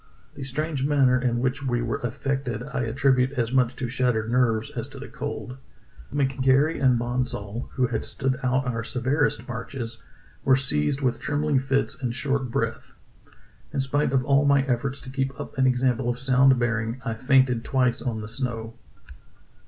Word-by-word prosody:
The 140 - -7
strange 140 +1 -2
manner 135 -3 +3
in 120 -2 +1
which 130 +2 0
we 120 -3 0
were 115 - -2
affected 125 -1 -2
I 125 -1 -3
attribute 130 +2 +2
as 120 -3 -1
much 125 -2 +2
to 125 - -3
shattered 120 -3 0
nerves 115 -3 +2
as - - -4
to - - -11
the - - -7
cold. 125 +1 -6 0.5
McGary 135 +2 +2
and 125 -2 +5
Bonsall, 120 -2 -3
who 130 - +2
had 115 -2 -2
stood 130 -1 -2
out 130 0 +1
our 115 -2 -2
severest 130 +7 0
marches, 120 -1 -6 0.4
were 130 - +5
seized 130 - 0
with 125 -3 0
trembling 150 -1 +1
fits 135 +1 -1
and 120 -2 -2
short 135 -1 -1
breath. 115 -1 -3 0.8
In - - -2
spite 140 +2 +1
of 130 -2 +1
all 140 0 +4
my 140 -1 +4
efforts 135 +1 -1
to 130 - -9
keep 135 +1 -2
up 145 - -7
an 130 - +5
example 125 -1 +1
of 120 - -1
sound 135 0 +4
bearing, 115 0 -1
I 115 - -1
fainted 130 0 +3
twice 125 -2 +1
on 115 -3 -2
the 105 - -6
snow. 115 -2 -4
130 Hz, 175 wpm, -25 LUFS, 120-135 Hz, 0.8 s, and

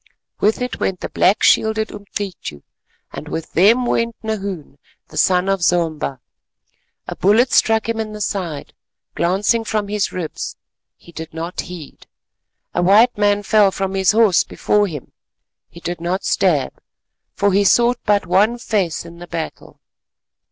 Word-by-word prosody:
With 220 +4 +1
it 250 - -5
went 185 -2 -2
the - - -4
black 205 +4 +2
shielded 220 0 +3
Umcityu 200 - -7 0.5
and - - -8
with 160 - -5
them 225 +8 +4
went 230 -1 0
Nahoon, 195 -10 -5 0.3
the - - -14
son 185 0 +3
of 195 -1 0
Zomba. 160 -6 0 0.9
A - - -5
bullet 225 +6 +3
struck 220 0 +3
him 230 -1 -2
in 220 -1 -3
the 210 - -8
side, 180 -8 -4 0.4
glancing 195 +6 +1
from 210 -2 -2
his 210 -1 -1
ribs, 170 -4 -5 0.4
he 170 - -17
did 160 -1 -9
not 165 +2 -4
heed; 175 -5 -11 0.7
a - - 0
white 210 +7 +5
man 205 0 +2
fell 210 -1 +4
from 195 0 -3
his 190 -1 +3
horse 215 -5 +4
before 210 0 0
him, 150 -7 -8 0.6
he 170 - -13
did 175 0 -5
not 180 +3 -2
stab, - - +1 0.6
for 200 -1 +1
he 200 +1 +4
sought 240 +4 +3
but 205 -2 +2
one 200 +6 +2
face 195 -9 -1
in 170 0 -12
the 175 - -9
battle. 165 -2 -7
195 Hz, 155 wpm, -19 LUFS, 175-215 Hz, 0.9 s, white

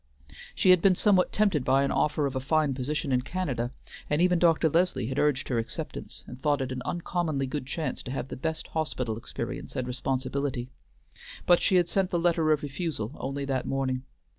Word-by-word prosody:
She 185 - +5
had 180 -2 +6
been 190 0 +5
somewhat 190 -1 +3
tempted 200 -10 +2
by 135 +2 +3
an 140 - 0
offer 150 -1 +1
of 135 -1 -2
a - - +1
fine 150 +1 +1
position 140 +2 -2
in 125 -1 +3
Canada, 130 -6 -2 0.4
and 150 - +1
even 180 0 +4
Dr. 165 -1 +4
Leslie 165 -6 +1
had 130 +4 -2
urged 150 -3 +1
her 120 -3 +1
acceptance, 115 - -5
and 125 +1 -10
thought 145 0 +2
it 130 -1 -2
an 130 -1 -4
uncommonly 170 -4 -1
good 135 0 -4
chance 155 +3 -3
to 125 - -7
have 135 -1 -4
the - - -5
best 160 +4 -4
hospital 130 -7 -2
experience 115 - -5
and 130 - -1
responsibility, 130 0 -2 0.7
but 175 -1 +5
she 190 - +3
had 175 -2 +4
sent 190 0 +1
the 175 - 0
letter 165 -2 +2
of 150 -1 +2
refusal 140 - -3
only 140 0 -4
that 135 -2 -1
morning. 130 -1 -1
140 Hz, 200 wpm, -28 LUFS, 130-165 Hz, 0.7 s, had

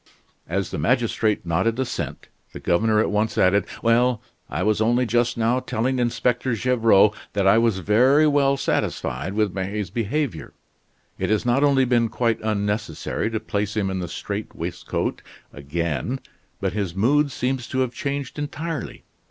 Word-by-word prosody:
As 95 +2 -1
the - - -3
magistrate 110 - +1
nodded 95 +8 +1
assent, 130 -2 -4 0.3
the - - -7
governor 105 +5 +2
at 110 - +1
once 105 +2 0
added: 100 +2 +3 0.2
"Well 120 +1 +3 0.3
I - - -2
was 110 0 +1
only 120 +3 +3
just 120 +1 +1
now 115 +2 +2
telling 125 +2 -1
Inspector 120 +1 0
Gevrol 110 -3 +4 0.2
that 100 -1 0
I 95 +4 +6
was 115 -4 +2
very 125 - +4
well 140 -2 +3
satisfied 80 - -2
with 105 -3 0
May's 100 -1 -3
behavior. 115 - -2 0.7
It - - -1
has 110 +1 +1
not 125 +4 +2
only 135 -2 +4
been 120 -2 +2
quite 115 -1 0
unnecessary 105 -2 -2
to 110 -1 -2
place 105 -1 -3
him 100 -2 0
in 95 - -2
the 90 - -3
strait 100 +5 -5
waistcoat 85 +1 -3 0.3
again, 80 - -3 0.4
but 95 -3 -1
his 100 -5 -2
mood 140 +8 +2
seems 130 0 -2
to 130 - -1
have 125 -2 -1
changed 140 0 -4
entirely. 150 0 -5
110 Hz, 160 wpm, -23 LUFS, 100-125 Hz, 0.7 s, I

